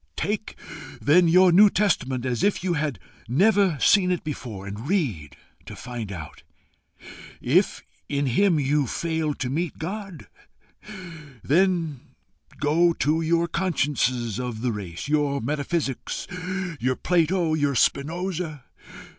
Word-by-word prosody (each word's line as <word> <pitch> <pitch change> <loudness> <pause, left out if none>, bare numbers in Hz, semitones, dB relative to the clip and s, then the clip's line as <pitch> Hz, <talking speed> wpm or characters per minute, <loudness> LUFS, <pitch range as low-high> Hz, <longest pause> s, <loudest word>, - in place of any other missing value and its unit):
Take 210 +5 -3 0.4
then 170 +4 +4
your 180 +2 +6
New 205 +4 +7
Testament 130 - 0
as 125 -3 -1
if 205 -3 +1
you 185 -2 0
had 145 -5 -1 0.3
never 190 - +3
seen 195 -4 +4
it 180 -2 -1
before, 120 -10 -6
and 105 +6 -7
read 100 - -1 0.3
to - - -8
find 120 -5 -6
out. 80 -6 -8 1.0
If - - +1 0.3
in 140 0 0
him 165 +6 +3
you 145 0 +1
fail 160 +1 -2
to 130 - -3
meet 160 +6 -2
God, 190 -1 -6 1.2
then 165 -3 +1 0.6
go 165 +3 +3
to 155 +1 0
your 170 +1 +1
consciousness 130 - 0
of 120 -3 -4
the 125 -1 0
race, 95 -1 -6
your 145 -2 +1
metaphysics, 145 +2 -2 0.5
your 130 +2 0
Plato, 175 0 +1
your 145 -3 +1
Spinosa. 160 +2 -1
150 Hz, 125 wpm, -24 LUFS, 125-175 Hz, 1.2 s, New